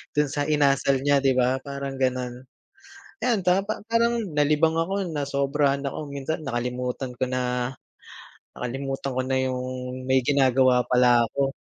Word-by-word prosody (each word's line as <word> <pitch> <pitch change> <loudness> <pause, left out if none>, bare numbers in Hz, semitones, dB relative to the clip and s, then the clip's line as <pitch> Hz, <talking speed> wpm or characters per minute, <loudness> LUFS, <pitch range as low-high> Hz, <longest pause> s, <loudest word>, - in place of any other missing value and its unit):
dun 150 -1 +2
sa 145 +1 -1
inasal 140 -2 +2
niya 145 +1 +3
'di 135 -1 +4
ba, 130 +1 +2
parang 140 -1 -5
gano'n. 125 -1 -2 0.8
Ayan 235 -5 +2
ta 180 +2 +4
pa 215 +2 -4
parang 235 +1 +2 0.2
nalibang 150 +2 +3
ako, 190 +4 -1
nasobrahan 140 0 0
ako. 140 - -4
Minsan 140 +3 -4
nakalimutan 125 0 -3
ko 125 - -1
na 125 -1 -1 0.8
nakalimutan 135 +2 -4
ko 130 - +1
na 130 0 0
yung 125 0 -3 0.4
may 130 0 +3
ginagawa 130 -2 +3
pala 125 -1 +4
ako. 135 +3 -1
135 Hz, 145 wpm, -25 LUFS, 125-150 Hz, 0.8 s, di